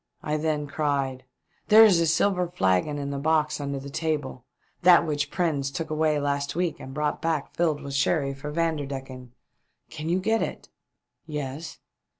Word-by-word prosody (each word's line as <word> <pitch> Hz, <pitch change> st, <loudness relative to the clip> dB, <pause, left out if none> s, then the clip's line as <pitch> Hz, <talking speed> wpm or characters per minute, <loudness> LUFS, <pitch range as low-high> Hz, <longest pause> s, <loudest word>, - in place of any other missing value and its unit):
I 150 Hz, -, -1 dB
then 155 Hz, -1 st, -1 dB
cried. 140 Hz, -3 st, -2 dB, 0.4 s
"There 220 Hz, +1 st, +9 dB
is 190 Hz, -6 st, +5 dB
a 165 Hz, -, +2 dB
silver 180 Hz, +2 st, +2 dB
flagon 95 Hz, -, +1 dB
in 140 Hz, -1 st, -4 dB
the 140 Hz, -, -3 dB
box 155 Hz, 0 st, +1 dB
under 140 Hz, -1 st, -3 dB
the 140 Hz, +1 st, -9 dB
table; 150 Hz, -5 st, -3 dB, 0.4 s
that 175 Hz, -1 st, +6 dB
which 145 Hz, -2 st, -1 dB
Prins 145 Hz, -6 st, 0 dB
took 155 Hz, +4 st, -5 dB
away 155 Hz, -1 st, +1 dB
last 140 Hz, 0 st, -1 dB
week 170 Hz, -2 st, -1 dB
and 130 Hz, -, -9 dB
brought 150 Hz, +1 st, -2 dB
back 160 Hz, -3 st, -1 dB
filled 155 Hz, -4 st, 0 dB
with 140 Hz, -1 st, -6 dB
sherry 140 Hz, 0 st, +1 dB
for 135 Hz, +2 st, -7 dB
Vanderdecken. 135 Hz, -6 st, -3 dB, 0.6 s
Can 155 Hz, +1 st, -5 dB
you 180 Hz, +2 st, +2 dB
get 220 Hz, +4 st, +1 dB
it?" -, -, -5 dB, 0.3 s
" -, -, -60 dB, 0.2 s
Yes." 150 Hz, +1 st, -5 dB
150 Hz, 170 wpm, -26 LUFS, 140-165 Hz, 0.6 s, There